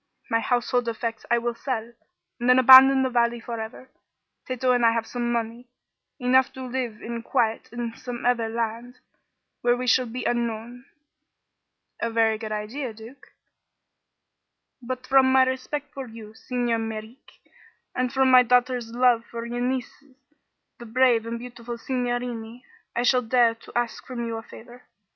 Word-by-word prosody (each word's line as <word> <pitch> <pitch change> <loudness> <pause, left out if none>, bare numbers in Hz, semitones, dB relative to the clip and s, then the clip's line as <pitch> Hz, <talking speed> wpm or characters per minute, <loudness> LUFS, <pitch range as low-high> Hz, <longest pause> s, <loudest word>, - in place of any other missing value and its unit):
My 230 - +3
household 245 0 0
effects 230 -1 -4
I 240 - +4
will 240 0 -1
sell, 230 -1 -4 0.5
and 240 +1 0
then 250 - +7
abandon 265 +1 +9
the 260 - +1
valley 235 -1 +1
forever. 230 +2 -7 0.6
Tato 255 0 0
and 245 -1 +2
I 230 0 +5
have 230 -1 -1
some 240 0 -3
money, 235 +1 -3 0.5
enough 255 +1 +3
to 260 - -8
live 245 -4 -4
in 235 0 -5
quiet 230 -2 -1
in 235 -1 -5
some 240 0 -7
other 235 -2 +1
land, 230 +2 -4 0.6
where 240 0 +2
we 250 - -3
shall 250 +1 +3
be 245 +3 -5
unknown." 235 +1 -3 1.1
"A 230 - -1
very 225 -1 +2
good 220 -1 -6
idea, 220 +3 -4
Duke." 225 +5 -14 1.5
"But 255 +1 -5
from 265 0 +4
my 260 0 +6
respect 265 +3 -3
for 270 -2 -6
you, 220 -2 -11
Signer 240 0 -2
Merreek, 225 +2 -8 0.5
and 255 -1 -1
from 265 -1 +3
my 255 0 +9
daughter's 250 -1 +1
love 240 -1 +3
for 235 0 -6
your 240 +1 -4
nieces 260 +2 -4 0.6
the 235 - -10
brave 235 -1 +3
and 230 0 -3
beautiful 240 0 -8
signorini 245 -1 -4 0.3
I 240 - 0
shall 250 0 +3
dare 235 0 +3
to 230 - -16
ask 240 -1 -2
from 240 -2 -5
you 230 -1 -4
a - - -6
favor. 240 +2 -14
240 Hz, 160 wpm, -25 LUFS, 230-255 Hz, 1.5 s, abandon